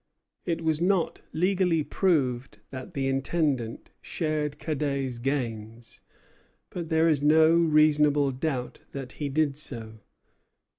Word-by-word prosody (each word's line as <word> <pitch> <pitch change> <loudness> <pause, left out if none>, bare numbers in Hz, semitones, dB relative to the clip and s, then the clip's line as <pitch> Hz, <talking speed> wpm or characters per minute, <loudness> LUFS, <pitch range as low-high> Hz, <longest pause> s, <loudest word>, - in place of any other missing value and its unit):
It 165 -2 -2
was 160 0 0
not 185 -1 +1
legally 180 -2 +1
proved 135 -9 0
that 130 -2 -8
the 135 -1 -1
Intendant 135 -3 -1
shared 155 -3 -2
Cadet's 140 -5 -2
gains; 115 -4 -4 0.7
but 170 -3 -5
there 160 0 +3
is 150 -4 +2
no 155 +2 +5
reasonable 150 -3 +4
doubt 130 -1 -4
that 135 -2 -6
he 145 - -1
did 145 -1 0
so. 115 -7 -3
145 Hz, 115 wpm, -27 LUFS, 130-160 Hz, 0.7 s, no